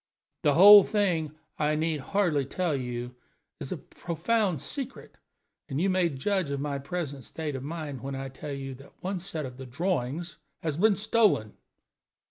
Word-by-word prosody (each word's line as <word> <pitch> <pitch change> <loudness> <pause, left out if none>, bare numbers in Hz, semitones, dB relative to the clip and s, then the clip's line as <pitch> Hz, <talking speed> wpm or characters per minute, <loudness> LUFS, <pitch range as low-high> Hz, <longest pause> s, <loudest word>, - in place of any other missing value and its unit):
The 145 -2 +3
whole 205 +3 +11
thing, 175 -8 0 0.2
I 150 0 +2
need 155 0 0
hardly 165 -2 +1
tell 165 +3 -1
you, 125 -1 -4 0.5
is - - -7
a - - -2
profound 180 - -1
secret, 270 - -6 0.5
and 135 0 -2
you 190 +3 +2
may 185 -2 +2
judge 165 +4 -1
of 140 -1 -2
my 140 0 -2
present 140 -2 -4
state 150 +3 -5
of 130 - -4
mind 150 -4 -5
when 135 0 -4
I 135 0 -5
tell 135 +2 -8
you 135 -1 -5
that 140 - -16
one 190 0 -2
set 165 -5 -3
of 130 0 -9
drawings 160 +1 -2 0.3
has 155 -3 -1
been 210 +3 +4
stolen." 210 - +2
155 Hz, 165 wpm, -28 LUFS, 135-185 Hz, 0.5 s, whole